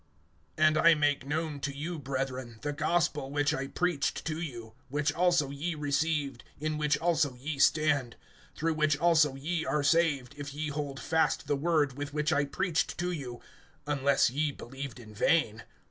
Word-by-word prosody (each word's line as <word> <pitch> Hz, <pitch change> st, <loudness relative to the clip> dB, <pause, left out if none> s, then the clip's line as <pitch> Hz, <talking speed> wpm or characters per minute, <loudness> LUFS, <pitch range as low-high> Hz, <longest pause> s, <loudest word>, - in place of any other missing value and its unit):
AND 155 Hz, 0 st, +4 dB
I 165 Hz, +1 st, +7 dB
make 145 Hz, -3 st, +1 dB
known 155 Hz, 0 st, -2 dB
to 140 Hz, 0 st, -4 dB
you, 160 Hz, +3 st, -4 dB
brethren, 130 Hz, -3 st, -4 dB
the 145 Hz, 0 st, -1 dB
gospel 150 Hz, -2 st, 0 dB
which 145 Hz, +1 st, +1 dB
I 135 Hz, +1 st, -2 dB
preached 175 Hz, -2 st, -1 dB
to 160 Hz, 0 st, -3 dB
you, 120 Hz, -8 st, -7 dB, 0.2 s
which 145 Hz, +2 st, 0 dB
also 175 Hz, -5 st, +2 dB
ye 155 Hz, +4 st, -3 dB
received, 145 Hz, -2 st, -1 dB, 0.2 s
in 155 Hz, 0 st, -2 dB
which 150 Hz, -1 st, +2 dB
also 160 Hz, -6 st, +1 dB
ye 140 Hz, +3 st, -5 dB
stand; 145 Hz, -6 st, +3 dB, 0.4 s
(2)through 160 Hz, 0 st, 0 dB
which 155 Hz, -1 st, +2 dB
also 155 Hz, -4 st, +4 dB
ye 160 Hz, +4 st, -2 dB
are 150 Hz, 0 st, 0 dB
saved, 145 Hz, -4 st, +2 dB
if 140 Hz, -1 st, -6 dB
ye 150 Hz, 0 st, -2 dB
hold 140 Hz, -2 st, -4 dB
fast 160 Hz, -1 st, +1 dB
the 145 Hz, -, +1 dB
word 145 Hz, -3 st, +1 dB
with 145 Hz, 0 st, -5 dB
which 150 Hz, +2 st, +1 dB
I 145 Hz, -2 st, +2 dB
preached 170 Hz, +3 st, -1 dB
to 180 Hz, +1 st, -1 dB
you, 130 Hz, -8 st, -6 dB, 0.4 s
unless 140 Hz, -3 st, +2 dB
ye 145 Hz, +3 st, 0 dB
believed 135 Hz, -1 st, -8 dB
in 110 Hz, -3 st, -12 dB
vain. 110 Hz, -2 st, +1 dB
145 Hz, 175 wpm, -30 LUFS, 135-160 Hz, 0.4 s, I